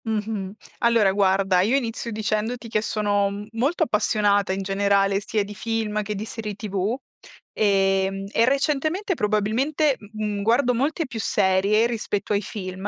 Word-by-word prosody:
Mh-mh. 210 Hz, -3 st, -3 dB, 0.3 s
Allora 230 Hz, -5 st, +4 dB
guarda, 190 Hz, -1 st, +3 dB
io 220 Hz, +8 st, +2 dB
inizio 235 Hz, -3 st, -2 dB
dicendoti 220 Hz, +2 st, -2 dB
che 215 Hz, -1 st, +1 dB
sono 205 Hz, -1 st, 0 dB
molto 275 Hz, +9 st, 0 dB
appassionata, 210 Hz, -5 st, +2 dB
in 195 Hz, +1 st, -2 dB
generale, 195 Hz, 0 st, +2 dB
sia 215 Hz, 0 st, 0 dB
di 205 Hz, +1 st, -8 dB
film 215 Hz, -1 st, -2 dB
che 210 Hz, 0 st, -4 dB
di 205 Hz, +2 st, -4 dB
serie 215 Hz, -2 st, -6 dB
TV, 200 Hz, +1 st, -2 dB, 0.6 s
ehm, 195 Hz, -1 st, +1 dB
e 230 Hz, -, +3 dB
recentemente 300 Hz, -, 0 dB
probabilmente, 255 Hz, -, +1 dB
mhmm, 210 Hz, 0 st, -4 dB
mhmm, -, -, -3 dB
guardo 240 Hz, +4 st, +3 dB
molte 290 Hz, +7 st, 0 dB
più 240 Hz, -4 st, -7 dB
serie 200 Hz, +2 st, +2 dB
rispetto 215 Hz, -3 st, -2 dB
ai 200 Hz, -, +1 dB
film, 190 Hz, -2 st, -6 dB
210 Hz, 150 wpm, -23 LUFS, 200-230 Hz, 0.6 s, Allora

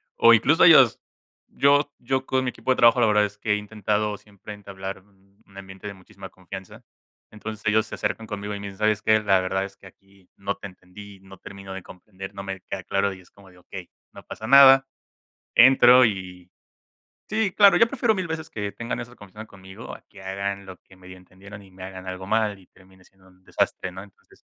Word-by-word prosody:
O 115 Hz, -, +6 dB
incluso 130 Hz, +8 st, +3 dB
ellos, 135 Hz, -, +7 dB, 0.5 s
yo 145 Hz, +1 st, +2 dB
yo 130 Hz, +2 st, -2 dB
con 130 Hz, 0 st, 0 dB
mi 125 Hz, -, 0 dB
equipo 130 Hz, -, -3 dB
de 130 Hz, -, +1 dB
trabajo 120 Hz, +1 st, +5 dB
la 115 Hz, -, +5 dB
verdad 105 Hz, 0 st, +3 dB
es 105 Hz, 0 st, -9 dB
que 105 Hz, -, -3 dB
he -, -, +2 dB
intentado 105 Hz, 0 st, -2 dB
siempre 105 Hz, 0 st, -13 dB
entablar 95 Hz, -1 st, -8 dB
un 100 Hz, -1 st, -30 dB, 0.2 s
ambiente 95 Hz, 0 st, -12 dB
de 100 Hz, -, -6 dB
muchísima 95 Hz, 0 st, -13 dB
confianza, 95 Hz, 0 st, -11 dB, 0.5 s
entonces 110 Hz, 0 st, -9 dB
ellos 110 Hz, +1 st, +2 dB
se -, -, -12 dB
acercan 110 Hz, -, -4 dB
conmigo 105 Hz, -1 st, -6 dB
y -, -, -7 dB
me 100 Hz, -, -7 dB
dicen: 95 Hz, -, -11 dB
"¿Sabes 110 Hz, -1 st, +1 dB
qué? 110 Hz, 0 st, +3 dB
La 100 Hz, -2 st, +3 dB
verdad 95 Hz, +1 st, -2 dB
es 100 Hz, 0 st, -12 dB
que 100 Hz, -, -20 dB
aquí 95 Hz, 0 st, -23 dB
no 100 Hz, +1 st, -4 dB
te -, -, -12 dB
entendí. 95 Hz, +2 st, -14 dB
No 95 Hz, 0 st, -15 dB
termino 95 Hz, -1 st, -10 dB
de 95 Hz, -, -8 dB
comprender. 95 Hz, +2 st, -11 dB
No 100 Hz, -, -6 dB
me 95 Hz, -1 st, -7 dB
queda -, -, -7 dB
claro". 100 Hz, 0 st, -1 dB
Y 95 Hz, -, -14 dB
es 90 Hz, -, -22 dB
como 100 Hz, -1 st, -19 dB
de: 90 Hz, -, -21 dB
"Okey, 90 Hz, 0 st, -11 dB, 0.2 s
no -, -, -13 dB
pasa 110 Hz, -, -9 dB
nada", 135 Hz, 0 st, +7 dB, 0.7 s
entro 125 Hz, 0 st, +7 dB
y 90 Hz, -4 st, -5 dB, 0.8 s
sí 215 Hz, -3 st, 0 dB
claro 200 Hz, -2 st, +6 dB
yo 230 Hz, -, +5 dB
prefiero 240 Hz, -3 st, 0 dB
mil 185 Hz, -2 st, -3 dB
veces 160 Hz, -1 st, -6 dB
que 105 Hz, -5 st, -5 dB
tengan 120 Hz, 0 st, -5 dB
esa 120 Hz, +1 st, -10 dB
confianza 105 Hz, 0 st, -12 dB
conmigo 95 Hz, +1 st, -12 dB
a -, -, -16 dB
que 100 Hz, -, -15 dB
hagan 100 Hz, +1 st, -5 dB
lo 95 Hz, -, -10 dB
que 95 Hz, -, -22 dB
medio 95 Hz, 0 st, -14 dB
entendieron 100 Hz, +3 st, -14 dB
y 95 Hz, -, -18 dB
me 95 Hz, 0 st, -12 dB
hagan 95 Hz, 0 st, -9 dB
algo 95 Hz, 0 st, -7 dB
mal 110 Hz, -1 st, 0 dB
y 95 Hz, -, -21 dB
termine 95 Hz, -1 st, -23 dB
siendo 95 Hz, -1 st, -24 dB
un 95 Hz, 0 st, -26 dB
desastre, 90 Hz, -, -2 dB
¿no? 95 Hz, -, -9 dB
Entonces 100 Hz, -1 st, -21 dB
100 Hz, 215 wpm, -23 LUFS, 95-110 Hz, 0.8 s, ellos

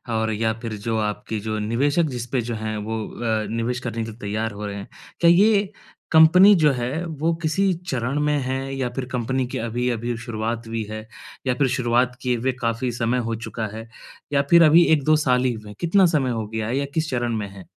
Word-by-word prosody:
और 110 Hz, 0 st, 0 dB
या 110 Hz, +1 st, 0 dB
फिर 115 Hz, -2 st, -4 dB
जो 115 Hz, -1 st, 0 dB
आपके 105 Hz, 0 st, -3 dB
जो 110 Hz, +1 st, -3 dB
निवेशक 135 Hz, +10 st, +1 dB
जिस 120 Hz, -3 st, -4 dB
पे 130 Hz, -, +1 dB
जो 120 Hz, 0 st, -4 dB
हैं, 110 Hz, 0 st, -4 dB
वो 110 Hz, +1 st, -3 dB
अ, 110 Hz, -2 st, -2 dB
निवेश 120 Hz, +2 st, -1 dB
करने 115 Hz, -2 st, -4 dB
के 110 Hz, -, -6 dB
लिए 110 Hz, -, -15 dB
तैयार 110 Hz, +1 st, -2 dB
हो 105 Hz, +1 st, -7 dB
रहे 100 Hz, -1 st, -5 dB
हैं। 100 Hz, -, -7 dB, 0.3 s
क्या 170 Hz, -, +5 dB
ये 200 Hz, +2 st, +4 dB, 0.4 s
कंपनी 180 Hz, +5 st, +8 dB
जो 155 Hz, -4 st, +4 dB
है, 130 Hz, +7 st, -3 dB
वो 160 Hz, 0 st, -1 dB
किसी 185 Hz, +4 st, +1 dB, 0.2 s
चरण 130 Hz, +2 st, -1 dB
में 150 Hz, 0 st, +1 dB
है 135 Hz, +1 st, -3 dB
या 130 Hz, -2 st, -1 dB
फिर 135 Hz, -, -3 dB
कंपनी 130 Hz, +1 st, -1 dB
की -, -, -5 dB
अभी-अभी 120 Hz, +1 st, -2 dB
शुरुआत 115 Hz, 0 st, -4 dB
हुई 115 Hz, 0 st, -3 dB
है? 110 Hz, 0 st, -7 dB, 0.4 s
या 125 Hz, -, +3 dB
फिर 135 Hz, +1 st, +2 dB
शुरुआत 125 Hz, 0 st, +1 dB
किए 125 Hz, -1 st, 0 dB
हुए 130 Hz, +3 st, 0 dB
काफ़ी 115 Hz, +2 st, -1 dB
समय 120 Hz, +1 st, 0 dB
हो 115 Hz, -, -1 dB
चुका 110 Hz, -2 st, -4 dB
है 115 Hz, +1 st, -8 dB, 0.5 s
या 140 Hz, -, +4 dB
फिर 170 Hz, 0 st, +8 dB
अभी 165 Hz, +2 st, +7 dB
1-2 155 Hz, +1 st, +3 dB
साल 125 Hz, 0 st, +3 dB
ही 125 Hz, -, +2 dB
हुए 110 Hz, -2 st, -10 dB
हैं? 105 Hz, -, -10 dB
कितना 185 Hz, +3 st, +4 dB
समय 130 Hz, -4 st, +1 dB
हो 110 Hz, -2 st, -3 dB
गया 110 Hz, 0 st, -3 dB
है 125 Hz, +4 st, -1 dB
या 140 Hz, -, 0 dB
किस 160 Hz, 0 st, -1 dB
चरण 120 Hz, -2 st, -1 dB
में 105 Hz, -1 st, -3 dB
है? 95 Hz, -2 st, -12 dB
120 Hz, 225 wpm, -23 LUFS, 110-140 Hz, 0.5 s, कंपनी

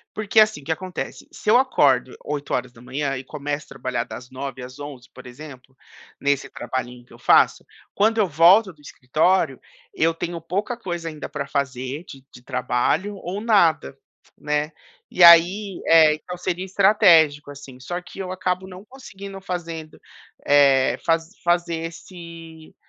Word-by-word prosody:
Porque, 215 Hz, +1 st, +3 dB
assim, 215 Hz, -9 st, +2 dB
o -, -, -17 dB
que 160 Hz, -, -2 dB
acontece? 185 Hz, +2 st, -6 dB
Se 210 Hz, -, -3 dB
eu 235 Hz, -, +6 dB
acordo 135 Hz, -, +2 dB
8 145 Hz, -1 st, -5 dB
horas 125 Hz, -, -3 dB
da 115 Hz, -, -18 dB
manhã 135 Hz, +3 st, -3 dB
e 130 Hz, -, -6 dB
começo 145 Hz, +1 st, -5 dB
a -, -, -29 dB
trabalhar 120 Hz, -2 st, -3 dB
das 125 Hz, +1 st, -10 dB
9 130 Hz, -1 st, -7 dB
às 130 Hz, +2 st, -10 dB
11, 140 Hz, -3 st, -9 dB
por 130 Hz, -, -13 dB
exemplo, 130 Hz, 0 st, -12 dB, 0.4 s
nesse 140 Hz, -1 st, 0 dB
trabalhinho 125 Hz, -1 st, -6 dB
que -, -, -22 dB
eu -, -, -15 dB
faço, -, -, +3 dB, 0.3 s
quando 220 Hz, +2 st, +2 dB
eu 210 Hz, -, +3 dB
volto 180 Hz, +6 st, +5 dB
do 155 Hz, -, -26 dB
escritório, 155 Hz, +6 st, 0 dB, 0.3 s
eu 165 Hz, -, +2 dB
tenho 170 Hz, +1 st, -5 dB
pouca 195 Hz, +8 st, -3 dB
coisa 175 Hz, -6 st, -5 dB
ainda 155 Hz, -2 st, -7 dB
pra 140 Hz, -2 st, -5 dB
fazer 140 Hz, +1 st, -3 dB
de 135 Hz, -6 st, -13 dB
de 125 Hz, -, -15 dB
trabalho 125 Hz, +10 st, -1 dB
ou 190 Hz, +2 st, -6 dB
nada, 170 Hz, -, +2 dB, 0.4 s
né. 150 Hz, +1 st, -2 dB, 0.4 s
E 180 Hz, -, +4 dB
aí, 180 Hz, +4 st, +6 dB
eh, 160 Hz, -2 st, +6 dB
então, 180 Hz, +4 st, -8 dB
seria 180 Hz, 0 st, -3 dB
estratégico, 180 Hz, -7 st, +4 dB
assim, 140 Hz, -2 st, -12 dB
só 175 Hz, +7 st, -5 dB
que 180 Hz, -, -14 dB
eu 185 Hz, -1 st, -5 dB
acabo 185 Hz, 0 st, -2 dB
não 185 Hz, +1 st, -11 dB
conseguindo 200 Hz, -6 st, -11 dB
fazendo, 165 Hz, -4 st, -6 dB, 0.5 s
eh, 140 Hz, -2 st, +4 dB
faz 165 Hz, 0 st, +1 dB
fazer 175 Hz, -1 st, 0 dB
esse, 165 Hz, -2 st, -12 dB
160 Hz, 165 wpm, -22 LUFS, 140-185 Hz, 0.5 s, eu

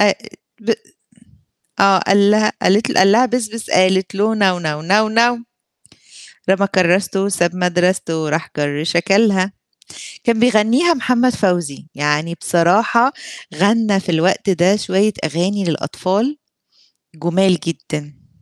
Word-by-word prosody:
أ 205 Hz, -1 st, +4 dB, 0.5 s
ب 225 Hz, +2 st, -3 dB, 1.1 s
آه، 195 Hz, -1 st, +4 dB
قال 200 Hz, +1 st, +3 dB
لها 215 Hz, 0 st, +2 dB
قالت 205 Hz, +5 st, +2 dB
ل -, -, -2 dB
قال 195 Hz, +1 st, +5 dB
لها 235 Hz, +5 st, +4 dB
بِس، 250 Hz, -2 st, -2 dB
بِس، 230 Hz, 0 st, -9 dB
قالت 185 Hz, 0 st, +1 dB
له 215 Hz, +3 st, 0 dB
نَو، 190 Hz, -4 st, +1 dB
نَو. 155 Hz, -2 st, -4 dB
نَو، 205 Hz, +6 st, +2 dB
نَو. 235 Hz, +1 st, +1 dB, 1.1 s
رمى 195 Hz, +1 st, +2 dB
كرّاسته 185 Hz, +2 st, +1 dB
وساب 180 Hz, -3 st, -1 dB
مدرسته 180 Hz, -2 st, -1 dB
وراح 155 Hz, +1 st, -3 dB
جَر 145 Hz, 0 st, -2 dB
شَكَلها، 195 Hz, +3 st, +1 dB, 0.7 s
كان 230 Hz, -2 st, +1 dB
بيغنيها 245 Hz, +8 st, +3 dB
محمد 250 Hz, -2 st, +1 dB
فوزي، 175 Hz, -8 st, -2 dB
يعني 150 Hz, +3 st, -1 dB
بصراحة 215 Hz, +9 st, +2 dB, 0.4 s
غنّى 205 Hz, +3 st, +1 dB
في 195 Hz, -, -15 dB
الوقت 180 Hz, +4 st, +1 dB
ده 185 Hz, +2 st, +2 dB
شوية 210 Hz, +1 st, 0 dB
أغاني 180 Hz, +6 st, -2 dB
للأطفال، 195 Hz, -, -2 dB, 0.8 s
جُمال 175 Hz, +3 st, +1 dB
جدًا. 150 Hz, -3 st, -7 dB
195 Hz, 125 wpm, -17 LUFS, 175-215 Hz, 1.1 s, قال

